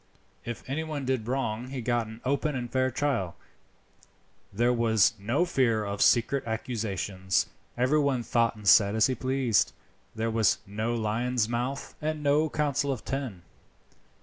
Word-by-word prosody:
If 120 -1 -5
anyone 150 0 -3
did 130 -4 -1
wrong 125 -2 -2
he 135 0 -5
got 120 -1 0
an 110 +1 -11
open 140 +2 0
and 120 -2 -4
fair 130 0 +2
trial. 125 -9 -1 1.2
There 120 +5 +2
was 115 -2 +3
no 120 - +1
fear 115 -10 +1
of 100 0 -4
secret 130 +3 +3
accusations. 100 -5 -1 0.3
Everyone 135 0 +2
thought 115 0 +1
and 105 -2 -9
said 100 +2 +6
as 110 - +4
he 130 - +1
pleased. 130 -3 +1 0.4
There 115 +1 -1
was 110 -1 +3
no 110 +4 -2
Lion's 115 +1 0
Mouth, 125 +4 -3
and 155 0 -2
no 150 +2 +3
Council 145 -2 0
of 120 -5 -5
Ten." 130 -10 -4
120 Hz, 150 wpm, -28 LUFS, 110-135 Hz, 1.2 s, said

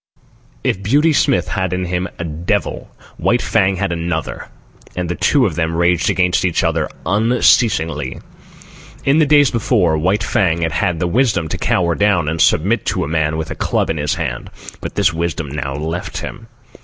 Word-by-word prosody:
If 95 - 0
Beauty 145 +10 +3
Smith 90 - +2
had 95 -1 -1
in 90 0 -2
him 90 +1 -2
a - - -4
devil, 80 +1 -2 0.3
White - - +1
Fang 95 0 +2
had 100 0 -2
another; 85 -1 -3 0.5
and 90 -1 -2
the 90 - -2
two 135 - +3
of 95 - -1
them 80 +1 -1
raged 85 0 +2
against 90 -1 +1
each 90 -3 +1
other - - 0 0.2
unceasingly. 95 - +2 0.9
In 140 +3 +4
the 155 - +4
days 145 -2 +5
before, 100 -9 +1
White 95 +6 +1
Fang 85 -6 +1
had 80 - 0
had 85 0 0
the 90 - 0
wisdom 110 -3 +1
to - - -3
cower 85 -2 +1
down 100 -5 +2
and 80 0 -1
submit 90 +7 +2
to - - 0
a - - -3
man 80 0 0
with 80 - -4
a - - -4
club - - 0
in 80 - -3
his 75 -1 -1
hand; - - -4 0.3
but - - -7
this 95 -4 +2
wisdom 80 -2 -3
now 70 -1 -4
left 85 +5 -4
him. 115 -1 -7
90 Hz, 185 wpm, -18 LUFS, 80-100 Hz, 0.9 s, days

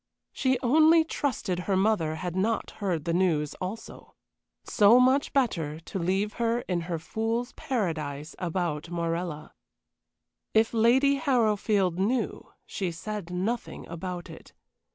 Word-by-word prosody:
She 260 -1 +1
only 315 +6 +5
trusted 245 - -2
her 190 - +3
mother 190 -6 +1
had 175 +1 -4
not 220 +4 0
heard 175 -7 -1
the 170 - 0
news 165 -5 +1
also. 200 +5 -7 0.5
So 220 +3 +5
much 260 +3 +3
better 165 - 0
to 165 +3 -6
leave 190 +4 0
her 235 +1 +1
in 180 -6 -2
her 170 - -1
fool's 225 +8 -2
paradise 155 - -3
about 170 -3 -2
Morella. 170 -2 -3 1.0
If 220 +1 +3
Lady 260 +5 +4
Harrowfield 215 - +1
knew, 235 +6 -1
she 185 -4 -3
said 200 +2 -6
nothing 195 +7 -3
about 175 +1 -5
it. - - -13
195 Hz, 130 wpm, -27 LUFS, 170-235 Hz, 1.0 s, only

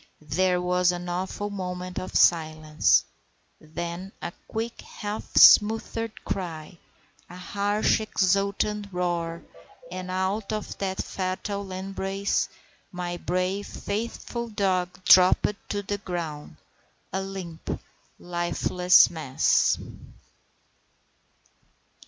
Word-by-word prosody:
There 180 +2 +2
was 180 0 +2
an 175 0 -5
awful 190 +3 -3
moment 180 -2 -4
of 185 - -7
silence, 155 -2 +3 0.5
then 170 +4 -6
a 175 - -5
quick 225 +1 -4
half 210 0 -6
smothered 225 +1 +5
cry, 170 -2 -5 0.5
a 175 - -10
harsh 205 +4 +1
exultant 200 +1 0
roar, 170 -2 -2 0.5
and 185 0 -6
out 190 +3 -1
of 215 -1 -4
that 190 -1 -2
fatal 195 +1 -4
embrace 195 +1 -2 0.4
my 180 -1 -4
brave, 185 +3 -1
faithful 235 +3 -4
dog 185 -4 -1
dropped 185 +3 +6 0.2
to 205 -1 -2
the 205 +1 -3
ground, 165 - -5 0.6
a 190 - 0
limp, 190 -4 -6 0.4
lifeless 175 +1 +3
mass. 155 -6 +2
185 Hz, 95 wpm, -26 LUFS, 175-200 Hz, 0.6 s, dropped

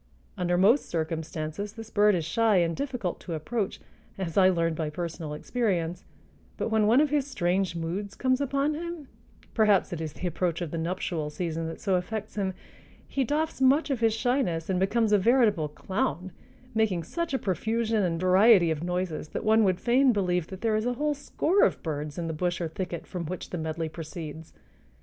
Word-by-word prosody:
Under 175 -2 0
most 220 +10 +4
circumstances 160 +3 -3
this 225 -1 -10
bird 210 -1 +4
is 165 -3 -1
shy 225 +5 +2
and 170 -2 +2
difficult 250 -10 -3
to 170 - -5
approach, 200 +6 -3 0.4
as 175 -4 -4
I 185 -1 +6
learned 165 -3 +1
by 155 -1 -2
personal 160 -1 -5
experience; 180 -4 -1 0.5
but - - -1
when 220 -1 +3
one 240 +6 +5
of 300 -2 +1
his 290 -2 +1
strange 185 -7 0
moods 180 +5 -4
comes 260 0 +1
upon 280 +2 +1
him—perhaps 285 - -1
it 165 - -4
is 155 -2 -4
the - - -6
approach 175 -1 -1
of 170 -4 -4
the 165 - -3
nuptial 165 -2 -2
season 165 +1 -3
that 165 - -6
so 195 - 0
affects 215 +4 -4
him—he 200 +6 -5
doffs 300 +2 -1
much 280 +3 +4
of 265 - 0
his 225 -1 +2
shyness 210 -9 0
and 180 - +1
becomes 215 +3 +2
a 210 - +5
veritable 215 -7 +3
clown, 180 +2 -3 0.4
making 205 -6 +1
such 335 - -3
a - - +3
profusion 220 +2 0
and 170 -3 0
variety 185 -1 +5
of 155 -1 -2
noises 180 -3 -2
that - - -5
one 220 +1 +5
would 185 -3 +2
fain 255 +2 +4
believe 180 -5 0
that 190 -1 -9
there 225 -1 +1
is 215 +2 0
a 245 - +1
whole 295 +4 0
score 320 +6 0
of - - +1
birds 150 -2 -4
in 170 - -2
the 165 - -3
bush 175 +3 -1
or 170 - -1
thicket 175 +1 -5
from 180 -2 -5
which 180 +2 -6
the 180 - -3
medley 160 +1 -3
proceeds. 160 0 -8
185 Hz, 190 wpm, -27 LUFS, 165-225 Hz, 0.5 s, I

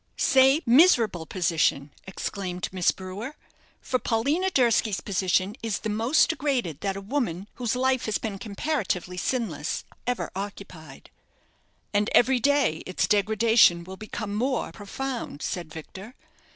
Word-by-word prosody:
"Say, 270 +4 +4
miserable 230 - +4
position," 160 -5 0 0.2
exclaimed 185 -2 -4
Miss 180 -2 +2
Brewer; 195 +9 -5 0.5
"for 255 - -1
Paulina 280 +13 0
Durski's 235 - +2
position 190 +1 0
is 225 -2 -1
the 220 - -4
most 230 +8 +3
degraded 255 - -2
that 195 -1 -1
a 195 - -5
woman 200 - -2
whose 245 -1 -1
life 260 0 +1
has 215 - 0
been 200 -3 -5
comparatively 200 - -2
sinless 180 - -2 0.2
ever 245 -1 -2
occupied." 185 -7 -8 0.8
"And 205 +1 +2
every 250 +1 +5
day 280 - +2
its 185 - 0
degradation 210 -3 +4
will 190 +2 -9
become 215 0 -6
more 250 +4 -1
profound," 235 - -5
said 175 -5 -4
Victor. 190 - -10
210 Hz, 130 wpm, -26 LUFS, 185-250 Hz, 0.8 s, every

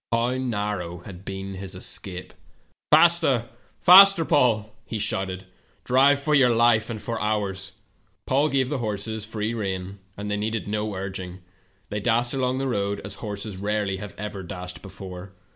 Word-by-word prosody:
How 120 +2 +1
narrow 105 -8 -3
had 95 -1 -10
been 95 0 -6
his 95 0 -6
escape! 90 0 -4 0.6
"'Faster, 155 -7 +5 0.3
faster, 190 -1 +8
Paul!' 110 -7 +2
he 115 - -5
shouted; 95 -3 -2 0.4
'drive 135 +3 +4
for 150 +2 -1
your 135 -4 +5
life 115 -1 +3
and 115 -2 -4
for 115 +2 -4
ours.' 100 -3 -2 0.5
"Paul 140 +4 +2
gave 135 -2 +1
the 145 -2 -2
horses 110 -1 -3
free 110 +1 -3
rein, 95 -3 -4 0.2
and 105 0 -4
they 105 - 0
needed 110 +1 -3
no 105 0 -2
urging. 95 -1 -6 0.5
The^^ 105 0 -2
dashed 120 +3 +1
along 130 -1 0
the 135 0 -1
road 100 -4 -1
as 100 - -3
horses 105 -2 -5
rareh" 100 -1 -2
ever 105 -2 -5
dashed 90 0 -7
before. 95 -1 -9
105 Hz, 155 wpm, -24 LUFS, 95-120 Hz, 0.6 s, faster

